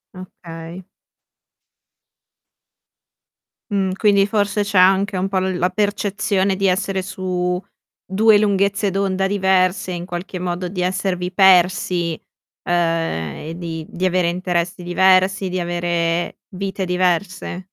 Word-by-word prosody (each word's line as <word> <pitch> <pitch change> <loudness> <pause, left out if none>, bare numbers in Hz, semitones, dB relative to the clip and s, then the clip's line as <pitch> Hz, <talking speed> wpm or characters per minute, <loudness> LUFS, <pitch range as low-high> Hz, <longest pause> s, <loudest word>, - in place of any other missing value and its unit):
Okay. 170 -1 -10 2.9
Mh. 190 -2 0
Quindi 200 -2 +3
forse 205 -1 0
c'è 205 -1 -2
anche 190 +2 +4
un 185 - 0
po' 190 -1 0
l 185 -1 -1
la 180 +1 +1
percezione 200 -1 0
di 195 0 +1
essere 190 +1 0
su 185 -1 -2 0.4
2 210 +3 +4
lunghezze 200 0 +1
d'onda 195 0 0
diverse, 190 -1 +1
in 175 -1 -5
qualche 180 +1 -6
modo, 180 0 -3
di 180 0 -4
esservi 180 -1 -1
persi, 180 -3 +3 0.5
ehm, 165 - -1
e - - -5
di 165 -2 -6
di 185 - -3
avere 185 -1 +2
interessi 175 0 -2
diversi, 190 +2 +3
di 185 - -2
avere 175 -1 -1
vite 195 0 -4
diverse. 180 0 -1
185 Hz, 120 wpm, -20 LUFS, 175-195 Hz, 2.9 s, anche